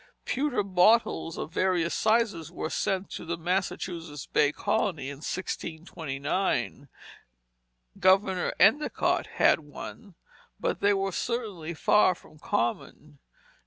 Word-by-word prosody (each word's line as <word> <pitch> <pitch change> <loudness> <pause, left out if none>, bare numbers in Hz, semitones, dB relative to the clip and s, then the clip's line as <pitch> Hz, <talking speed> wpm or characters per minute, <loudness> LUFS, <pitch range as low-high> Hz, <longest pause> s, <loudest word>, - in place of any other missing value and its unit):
Pewter 265 -5 0
bottles 190 -2 +3
of - - -5
various 180 -3 +1
sizes 215 -8 +1
were 160 -2 -4
sent 190 0 -1
to - - -6
the 170 0 -3
Massachusetts 170 -3 -3
Bay 145 -1 +2
Colony, 150 -4 -1
in 140 - -8
1629. 160 -2 -3 1.1
Governor 190 -1 +3
Endicott 240 +11 +3
had - - +5
one, 165 +6 -10 0.4
but - - -1
they 205 0 +3
were 195 0 -1
certainly 195 -8 -3
far 185 +3 +4
from 155 - -18
common. 145 +4 -3
180 Hz, 110 wpm, -28 LUFS, 160-200 Hz, 1.1 s, had